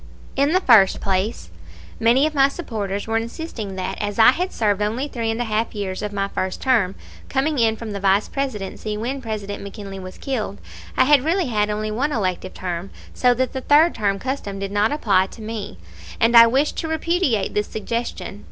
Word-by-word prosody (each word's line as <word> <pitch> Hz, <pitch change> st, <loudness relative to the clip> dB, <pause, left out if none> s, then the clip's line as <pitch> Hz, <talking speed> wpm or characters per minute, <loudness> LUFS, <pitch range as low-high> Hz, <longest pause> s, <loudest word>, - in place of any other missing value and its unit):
In 280 Hz, +2 st, +2 dB
the 370 Hz, +2 st, +3 dB
first 220 Hz, -, +5 dB
place, 190 Hz, -, -2 dB, 0.5 s
many 240 Hz, +5 st, +4 dB
of 310 Hz, -, -1 dB
my 275 Hz, -2 st, +5 dB
supporters 215 Hz, -, -4 dB
were 225 Hz, 0 st, 0 dB
insisting 230 Hz, -, -5 dB
that, 185 Hz, -1 st, -4 dB
as 205 Hz, -1 st, -3 dB
I 225 Hz, +2 st, +8 dB
had 360 Hz, +7 st, -2 dB
served 205 Hz, -2 st, 0 dB
only 225 Hz, +7 st, -1 dB
three 230 Hz, -5 st, -3 dB
and 225 Hz, +1 st, -2 dB
a -, -, +1 dB
half 220 Hz, 0 st, -1 dB
years 195 Hz, -2 st, -3 dB
of 210 Hz, -1 st, -3 dB
my 200 Hz, -1 st, -1 dB
first 185 Hz, -1 st, -3 dB
term, 225 Hz, -8 st, +2 dB, 0.3 s
coming 280 Hz, +1 st, 0 dB
in 225 Hz, -1 st, +3 dB
from 220 Hz, -1 st, -7 dB
the 200 Hz, -, -4 dB
Vice 195 Hz, +1 st, +2 dB
Presidency 215 Hz, -5 st, -4 dB
when 255 Hz, +5 st, -3 dB
President 210 Hz, -4 st, -5 dB
McKinley 200 Hz, -1 st, -8 dB
was 185 Hz, 0 st, -9 dB
killed, 225 Hz, -7 st, -3 dB, 0.4 s
I -, -, +6 dB
had 280 Hz, -1 st, +5 dB
really 335 Hz, -1 st, +1 dB
had 210 Hz, -2 st, +1 dB
only 215 Hz, +1 st, -2 dB
one 270 Hz, +8 st, -1 dB
elective 185 Hz, -6 st, -2 dB
term, 180 Hz, +1 st, -4 dB, 0.2 s
so 245 Hz, -1 st, +3 dB
that 255 Hz, +1 st, -1 dB
the 265 Hz, -, -3 dB
third 305 Hz, +5 st, +5 dB
term 200 Hz, -2 st, 0 dB
custom 250 Hz, -4 st, -4 dB
did 195 Hz, 0 st, -4 dB
not 205 Hz, +2 st, +2 dB
apply 200 Hz, -10 st, +2 dB
to 225 Hz, -, -13 dB
me; 215 Hz, -, -6 dB, 0.4 s
and 235 Hz, +1 st, +3 dB
I 230 Hz, 0 st, +10 dB
wished 270 Hz, +5 st, +1 dB
to 320 Hz, -, -2 dB
repudiate 320 Hz, -, 0 dB
this 210 Hz, 0 st, 0 dB
suggestion. 230 Hz, -2 st, -4 dB
220 Hz, 200 wpm, -22 LUFS, 200-265 Hz, 0.5 s, I